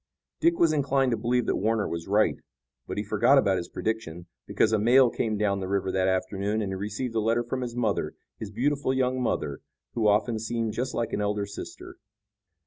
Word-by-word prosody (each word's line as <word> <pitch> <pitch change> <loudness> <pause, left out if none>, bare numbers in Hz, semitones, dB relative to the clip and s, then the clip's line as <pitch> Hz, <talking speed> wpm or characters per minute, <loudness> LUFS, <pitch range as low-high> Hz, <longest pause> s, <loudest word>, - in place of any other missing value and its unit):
Dick 335 +1 +3
was 165 -2 +4
inclined 135 -3 +1
to - - +2
believe 120 +2 0
that - - 0
Warner 110 +1 0
was 85 0 -5
right, 105 +2 +2 0.5
but - - -5
he 105 - -1
forgot 110 +6 +3
about 100 -7 +3
his 85 - -4
prediction, 100 -7 -4 0.2
because 110 - +2
a 110 - +3
mail 120 +3 +5
came 110 -2 -1
down 100 -1 +1
the 95 - -4
river 95 -1 0
that 95 0 +1
afternoon, 100 +3 -1
and 95 - -3
he - - -2
received 105 +5 -4
a 115 - +1
letter 115 +2 +1
from 130 +2 -3
his 120 -1 -4
mother, 115 -4 -1 0.2
his 110 - -5
beautiful 135 +4 0
young 130 0 0
mother, 70 - -1 0.3
who 115 -3 +1
often 110 +2 +2
seemed 115 0 -2
just 125 +2 -3
like 115 -1 -2
an - - 0
elder 105 0 -1
sister. 100 0 -9
110 Hz, 210 wpm, -27 LUFS, 100-125 Hz, 0.5 s, mail